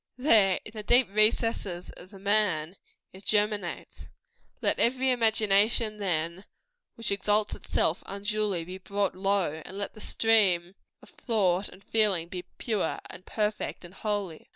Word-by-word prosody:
There, 215 Hz, -8 st, +4 dB
in -, -, -8 dB
the 215 Hz, -, -5 dB
deep 245 Hz, +3 st, +4 dB
recesses 215 Hz, -4 st, +1 dB
of 185 Hz, -, -12 dB
the 200 Hz, -, -13 dB
man, 195 Hz, -5 st, +1 dB, 0.4 s
it 190 Hz, +2 st, -13 dB
germinates. 210 Hz, -4 st, -1 dB, 0.5 s
Let -, -, 0 dB
every 260 Hz, +2 st, +2 dB
imagination, 220 Hz, -1 st, +3 dB
then, 175 Hz, -1 st, -2 dB, 0.5 s
which 230 Hz, -2 st, -4 dB
exalts 205 Hz, +1 st, +1 dB
itself 160 Hz, -, -1 dB
unduly, 205 Hz, -2 st, -2 dB
be 185 Hz, +2 st, -8 dB
brought 200 Hz, +1 st, -1 dB
low; 190 Hz, -5 st, 0 dB
and 190 Hz, -, -9 dB
let 200 Hz, -1 st, -4 dB
the 215 Hz, -, -11 dB
stream 195 Hz, -7 st, +3 dB, 0.3 s
of -, -, -16 dB
thought 200 Hz, -5 st, 0 dB
and 190 Hz, +2 st, -16 dB
feeling 200 Hz, -6 st, +1 dB
be 180 Hz, 0 st, -5 dB, 0.2 s
pure, 215 Hz, -8 st, -1 dB
and 185 Hz, -, -12 dB
perfect, 210 Hz, -3 st, -2 dB
and 175 Hz, -, -13 dB
holy. 200 Hz, -5 st, -4 dB
200 Hz, 145 wpm, -28 LUFS, 185-215 Hz, 0.5 s, There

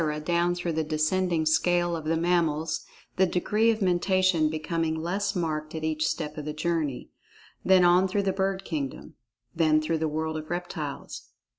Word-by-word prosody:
down 175 Hz, +1 st, +1 dB
through 175 Hz, -1 st, -3 dB
the 160 Hz, 0 st, 0 dB
descending 160 Hz, +2 st, 0 dB
scale 175 Hz, +2 st, +2 dB
of 160 Hz, -2 st, -6 dB
the 165 Hz, +1 st, +1 dB
mammals, 165 Hz, -2 st, 0 dB, 0.3 s
the 190 Hz, -, +4 dB
degree 210 Hz, +6 st, +1 dB
of 220 Hz, -2 st, +1 dB
Mentation 185 Hz, -2 st, +2 dB
becoming 160 Hz, +1 st, -2 dB
less 195 Hz, +6 st, -2 dB
marked 155 Hz, -3 st, -2 dB
at 160 Hz, -, -5 dB
each 155 Hz, 0 st, 0 dB
step 155 Hz, -1 st, -3 dB
of 150 Hz, -, -6 dB
the 150 Hz, -, -3 dB
journey. 155 Hz, -5 st, -2 dB, 0.5 s
Then 185 Hz, -1 st, +5 dB
on 180 Hz, +2 st, +5 dB
through 200 Hz, +2 st, 0 dB
the 190 Hz, -1 st, 0 dB
bird 195 Hz, 0 st, -1 dB
kingdom. 145 Hz, -5 st, -5 dB, 0.4 s
Then 155 Hz, -2 st, +4 dB
through 155 Hz, +1 st, -1 dB
the 160 Hz, -, 0 dB
world 160 Hz, +1 st, -2 dB
of 155 Hz, 0 st, -7 dB
reptiles. 165 Hz, -5 st, -5 dB
165 Hz, 170 wpm, -27 LUFS, 155-180 Hz, 0.5 s, Then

